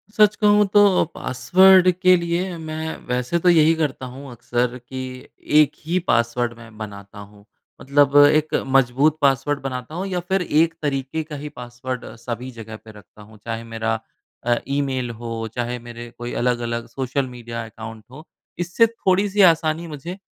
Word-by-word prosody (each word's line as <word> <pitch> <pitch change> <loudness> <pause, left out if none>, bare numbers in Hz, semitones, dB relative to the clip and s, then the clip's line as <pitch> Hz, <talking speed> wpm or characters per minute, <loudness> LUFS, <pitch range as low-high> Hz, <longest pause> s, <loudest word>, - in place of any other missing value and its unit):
सच 210 0 +5
कहूँ 210 0 +5
तो 205 -2 +5
पासवर्ड 185 +7 +5
के 185 +1 +4
लिए 170 +1 -2
मैं 160 0 -5
वैसे 125 +7 -1
तो 180 - +3
यही 160 -1 +5
करता 150 -5 -2
हूँ 135 +2 -10
अक्सर 120 +1 -2
कि 130 +1 -9 0.6
एक 150 -1 +2
ही 170 +3 0
पासवर्ड 120 0 +1
मैं 110 -2 -14
बनाता 100 -1 -9
हूँ। 100 0 -14 0.4
मतलब 140 +1 +2
एक 155 +1 +2 0.2
मजबूत 135 +4 +3
पासवर्ड 140 +1 +2
बनाता 130 +3 -5
हूँ 185 - -3
या 185 -2 -2
फिर 190 0 +2
एक 165 -1 +2
तरीके 140 +2 -2
का 150 -1 -8
ही 150 - -5
पासवर्ड 125 +1 -6
सभी 120 +2 -6
जगह 110 -2 -9
पे 110 - -11
रखता 105 0 -17
हूँ 105 +1 -15
चाहे 115 0 -4
मेरा 115 0 -1 0.5
अ, 120 - +3
ईमेल 135 -3 -1
हो 115 -1 -4
चाहे 120 0 -2
मेरे 120 0 -9
कोई 120 0 -6
अलग-अलग 120 -1 -1
सोशल 135 0 -2
मीडिया 120 -2 -7
अकाउंट 110 0 -10
हो 150 +5 -12 0.3
इससे 175 +7 +3
थोड़ी-सी 200 -2 +1
आसानी 160 +1 -2
मुझे 165 +4 -7
135 Hz, 160 wpm, -22 LUFS, 120-165 Hz, 0.6 s, सच